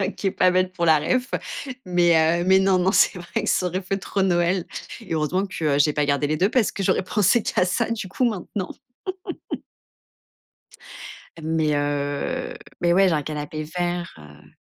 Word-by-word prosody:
OK 195 0 -1
pas 185 0 +5
bête 185 0 +1
pour 170 -2 -2
la 160 -2 +6
réf. 250 - 0 0.5
Mais 170 -2 +3
heu - - -1
mais 190 +1 +5
non, 190 -1 +3
non, 185 +2 +2
c'est - - +4
vrai 180 +5 -3
que - - -1
ça 180 - +2
aurait 185 +2 -2
fait 195 +2 -2
trop 195 +1 -2
Noël, 175 -1 +2 0.4
et 190 -8 -5
heureusement 175 +6 0
que 150 -6 0
j'ai 150 +1 +4
pas 150 - +1
gardé 140 0 +1
les 155 - 0
2 190 +6 +2
parce 245 -5 +2
que 195 - -4
j'aurais 185 - +2
pensé 210 +3 +2
qu'à 180 - +1
ça 220 +6 0
du 210 -5 -3
coup 250 +6 -1
maintenant 195 -1 -4 2.7
mais 160 -1 +1
heu 145 0 -2 0.3
mais, 170 0 +3
ouais, 190 +1 +5
j'ai 170 - +2
un 150 - 0
canapé 155 +1 -5
vert, 175 +2 -3
heu 75 0 -15
175 Hz, 185 wpm, -23 LUFS, 155-190 Hz, 2.7 s, la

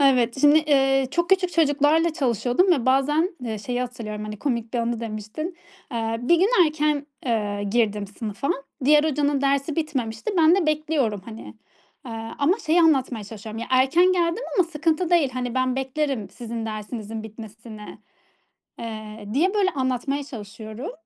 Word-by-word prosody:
Evet 260 -2 +3
şimdi, 295 +1 +7
eee, 270 -3 +3
çok 345 +1 0
küçük 375 -2 +3
çocuklarla 315 +1 +3
çalışıyordum 260 - +2
ve 265 -8 0
bazen, 295 +6 +3
eee, 220 -3 -3
şeyi 245 +4 -3
hatırlıyorum, 225 -4 -5
hani, 210 0 -6
komik 235 -3 -2
bir 240 - +1
anı 235 0 -1
demiştin. 225 - -5 0.4
Eee, 225 -1 -1
bir 280 +8 +4
gün 375 +4 +3 0.2
erken, 300 -1 0 0.2
eee, 205 -4 -1
girdim 210 -3 +1
sınıfa. 210 +5 -4 0.3
Diğer 295 +2 +5
hocanın 290 -2 +1
dersi 280 +2 0
bitmemişti. 265 - -2
Ben 325 +1 +6
de 375 -5 +1
bekliyorum 300 -9 0
hani, 225 +1 -10 0.5
eee, 235 - -6 0.3
ama 305 +7 +3
şeyi 325 +3 +4
anlatmaya 265 -9 +2
çalışıyorum; 215 +1 -8
"Ya, - - -4
erken 270 +8 +4
geldim 345 +5 0 0.2
ama 365 - +6
sıkıntı 325 +2 0
değil. 330 -6 +4
Hani 250 -1 -3
ben 255 0 +1
beklerim 265 -4 -2
sizin 230 -2 -6
dersinizin 215 0 -5
bitmesini." 220 0 -10 0.8
Eee, 215 -2 -7
diye 355 +9 +2
böyle 405 -3 +3
anlatmaya 270 +1 -1
çalışıyorum. 220 - -8
260 Hz, 155 wpm, -24 LUFS, 225-305 Hz, 0.8 s, şimdi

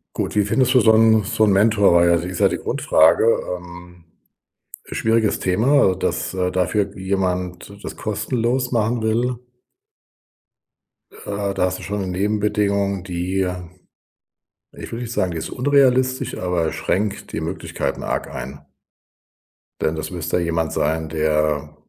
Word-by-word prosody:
Gut, - - -3
wie 105 - +3
findest 130 +5 +2
du 130 - +6
so 110 - +5
‘n 110 -1 +5
so 110 +2 +1
‘n 105 - +3
Mentor, 105 -2 +4
weil 85 0 +5
das 85 0 +2
ist 90 -1 -5
ja - - +5
die - - -2
Grundfrage 80 +1 +3 0.3
ähm, 90 0 -13 0.8
schwieriges 110 -1 +1
Thema, 110 +3 +3
dass, - - -2
äh, 90 -1 -1
dafür 95 +3 -1
jemand 95 -1 -2
das - - -6
kostenlos 120 +4 -1
machen 115 0 0
will 115 +3 0 1.8
äh, 100 -1 -4
da - - -14
hast 90 0 0
du - - -10
schon 105 0 -3
‘ne 95 - -3
Nebenbedingung, 100 0 0
die 90 +1 -3
ähm, 90 -2 -4 1.0
ich - - -10
will 115 - -4
nicht 120 -1 -5
sagen, 90 -6 0
die 85 - -4
ist - - -5
unrealistisch, 130 -1 +2
aber 90 -3 -1
schränkt 105 +1 -2
die - - -3
Möglichkeiten - - -4
arg - - -3
ein 70 +2 -7 1.2
denn 80 - 0
das 80 - -5
müsste 85 0 -2
jemand 85 -2 -1
sein, 80 +1 -1
der, 75 -1 0
95 Hz, 150 wpm, -21 LUFS, 85-110 Hz, 1.8 s, du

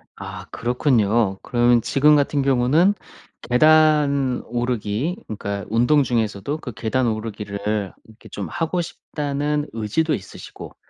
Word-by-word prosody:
아 - - -8
그렇군요. 115 -5 +1
그러면 120 -1 +3
지금 150 +5 +4
같은 145 0 +1
경우는 135 +8 +3 0.6
계단 145 -1 +4
오르기 120 - -2
그러니까 100 -1 -5
운동 120 +7 +3
중에서도 115 +2 -2
그 130 - -7
'계단 120 +5 -1
오르기를 105 -2 -3
이렇게 110 0 -17
좀 100 -3 -5
하고 165 - -1
싶다.'는 150 -2 -3
의지도 115 +9 0
있으시고 95 - -8
125 Hz, 290 characters per minute, -22 LUFS, 110-145 Hz, 0.6 s, 지금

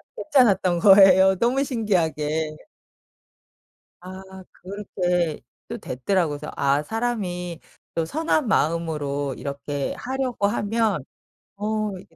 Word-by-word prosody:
괜찮았던 195 - +2
거예요 190 0 +7
너무 250 +5 +2
신기하게. 160 - -1 1.5
아 185 +1 -9 0.3
그렇게 180 -4 -2 0.3
또 - - -5
됐더라고. 160 +6 -1
그래서 150 +1 -8
'아 140 +1 +2
사람이 180 -5 -3 0.4
또 165 -1 0
선한 310 - 0
마음으로 150 -6 -1
이렇게 140 0 -4
하려고 255 -5 -1
하면 205 - 0 0.5
어 215 0 -1
이게 165 -2 -16
185 Hz, 230 characters per minute, -23 LUFS, 155-215 Hz, 1.5 s, 거예요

